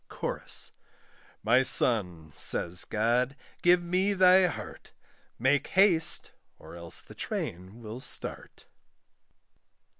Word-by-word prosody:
CHORUS. - - -4 0.7
"My 120 +4 +3
son," 90 -12 +4
says 85 +1 +1
God, 120 +5 -1 0.3
"give 175 0 +3
me 185 +4 0
thy 185 -1 +5
heart, 170 - -9 0.4
Make 135 +4 0
haste, 185 -5 +1 0.3
or - - -14
else 85 -1 -5
the - - -15
train 95 +7 -6
will 110 +3 -8
start." - - -6
125 Hz, 100 wpm, -27 LUFS, 105-175 Hz, 0.7 s, thy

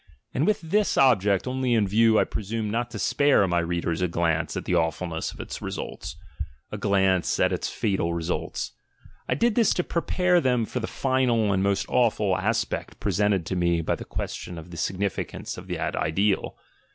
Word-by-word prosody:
And 145 - +1
with 215 - +2
this 200 +6 +1
object 105 -8 +4
only 130 -1 0
in 105 -3 +2
view 110 +2 +4
I - - +5
presumed 105 +1 -3
"not 120 +2 -1
to - - -7
spare" 140 -9 +3
my 90 -1 +1
readers 85 0 -1
a 90 - +2
glance 85 -1 0
at - - -4
the - - -1
awfulness 80 0 -1
of - - -14
its - - -6
results, - - -5 0.6
a 105 - -4
glance 95 -3 +2
at - - +3
its - - -2
fatal 95 -5 -1
results; 85 +1 -3 0.6
I - - +2
did 235 -1 +2
this 230 -1 +3
to 180 - +1
prepare 180 +1 +1
them 125 -4 +2
for 125 - -4
the 115 - -3
final 125 -6 +1
and 95 - +1
most 100 0 +1
awful 105 -5 +2
aspect 110 +5 -2
presented 100 -4 +1
to 95 - -3
me 85 -1 +2
by 80 - 0
the - - -5
question 85 - -5
of 80 +2 -10
the 85 - -8
significance 95 +1 -3
of - - -10
that - - -2
ideal. 95 +6 0
100 Hz, 190 wpm, -25 LUFS, 90-125 Hz, 0.6 s, I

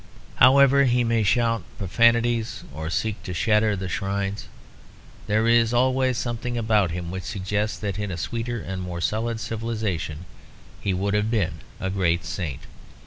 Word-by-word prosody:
However 140 +1 +6
he 125 -1 +3
may 115 -1 +1
shout 115 +2 +2 0.2
profanities 115 +3 +2
or 80 +2 -5
seek 105 +4 -2
to 90 - -6
shatter 105 +3 +2
the 95 -1 -4
shrines, 100 +2 -3 0.8
there 110 +2 +2
is 115 0 +4
always 130 0 +2
something 120 0 -3
about 110 -5 +2
him 85 +1 -4
which 95 0 -4
suggests 100 +5 -2
that 100 -1 -4
in 105 -1 -2
a 90 - -4
sweeter 115 +5 -3
and 95 -1 -5
more 90 -1 -5
solid 110 +5 -1
civilisation 105 -9 -3 0.6
he 100 - 0
would 100 +2 -1
have 105 +1 +1
been 95 -7 0 0.2
a 95 - -2
great 85 -3 +1
saint. 85 -5 -4
105 Hz, 155 wpm, -24 LUFS, 95-115 Hz, 0.8 s, However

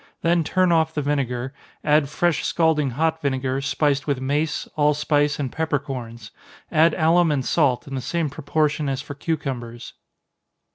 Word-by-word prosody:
Then 170 0 +3
turn 185 +3 +2
off 160 -1 +2
the 150 - -1
vinegar 135 -2 -2 0.3
add 150 -2 +3
fresh 175 +1 0
scalding 160 -4 +2
hot 160 +1 0
vinegar, 130 -1 -1
spiced 140 +1 0
with 140 -3 0
mace, 145 +4 -1
allspice, 150 0 +2
and 135 -4 -3
peppercorns 130 -8 -4 0.4
add 160 +2 +4
alum 165 +1 +3
and 135 -3 -1
salt, 140 -7 +1
in 135 - -7
the 130 - -2
same 165 +5 -1
proportion 150 +1 -1
as 135 -1 -3
for - - -7
cucumbers. 135 -6 -4
145 Hz, 150 wpm, -23 LUFS, 135-160 Hz, 0.4 s, add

